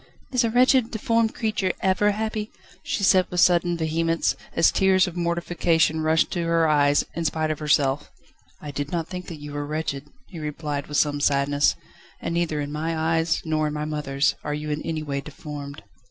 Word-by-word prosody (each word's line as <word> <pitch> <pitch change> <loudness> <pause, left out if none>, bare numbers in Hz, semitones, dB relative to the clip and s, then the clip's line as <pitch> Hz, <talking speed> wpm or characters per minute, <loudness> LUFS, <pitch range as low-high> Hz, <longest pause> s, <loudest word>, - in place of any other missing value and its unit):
"Is 250 -2 +2
a 230 - +1
wretched, 250 0 +4
deformed 230 0 0
creature 215 -5 0
ever 190 +2 +3
happy?" 215 0 -3 0.3
she 200 - -3
said 185 -1 +5
with 180 - -2
sudden 175 -1 +4
vehemence, 165 +1 0 0.2
as 165 - +5
tears 190 -1 +4
of 180 - -6
mortification 170 -2 +1
rushed 160 +1 +2
to 175 - -1
her 165 -1 +2
eyes, 145 -1 +3
in 170 - -3
spite 155 -1 0
of 155 - -4
herself. 145 -2 +1 0.5
"I 150 - -7
did 145 +1 -4
not 165 -2 -2
think 180 -1 -6
that 165 -3 -7
you 145 0 -8
were 145 0 -3
wretched," 150 -2 -3 0.2
he 175 - -10
replied 150 -1 -4
with 150 - -2
some 145 -1 +1
sadness, 145 0 +2 0.4
"and - - -3
neither 170 -3 0
in 145 0 -4
my 160 +2 -2
eyes, 165 +1 +1
nor 155 -1 0
in 150 - -3
my 150 0 -2
mother's, 150 -2 0
are 150 0 -2
you 150 0 -4
in 150 +1 -2
any 160 -1 -3
way 140 -2 -3
deformed." 145 -1 -8
160 Hz, 195 wpm, -24 LUFS, 150-175 Hz, 0.5 s, said